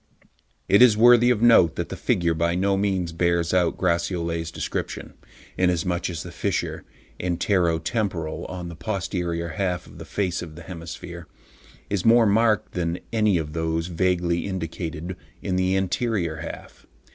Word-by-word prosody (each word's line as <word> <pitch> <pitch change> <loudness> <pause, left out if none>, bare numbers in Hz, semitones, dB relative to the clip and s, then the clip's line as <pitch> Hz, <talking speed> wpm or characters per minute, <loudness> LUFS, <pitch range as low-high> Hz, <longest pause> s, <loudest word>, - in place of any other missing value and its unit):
It 100 +3 +5
is 120 -4 +7
worthy 120 +1 +7
of 120 -2 +2
note 115 -9 +6
that - - -3
the - - -5
figure 85 -2 +1
by 85 +1 0
no 100 +2 +2
means 95 -3 0
bears 85 0 +1
out 90 -2 +2
Gratiolet's 85 -2 -1
description, - - -4 0.5
inasmuch 90 -1 +1
as 85 -3 -5
the - - -8
fissure - - -2 0.4
(antero 90 -1 +1
temporal) 90 -5 -2
on 90 -1 -6
the 85 - -8
posterior 85 -3 -3
half 90 +1 -2
of - - -14
the - - -8
face 90 -3 -2
of 80 -3 -8
the 85 - -10
hemisphere 85 0 -8 0.6
is 100 -3 -1
more 115 0 +6
marked 110 0 +2
than 85 -1 -2 0.2
any 105 -4 +3
of 75 -2 -4
those 80 +1 -1
vaguely 85 0 0
indicated 85 -1 -4 0.3
in 95 -2 -1
the 95 +1 +2
anterior 95 -3 -1
half. 80 +1 -9
90 Hz, 155 wpm, -24 LUFS, 85-100 Hz, 0.6 s, is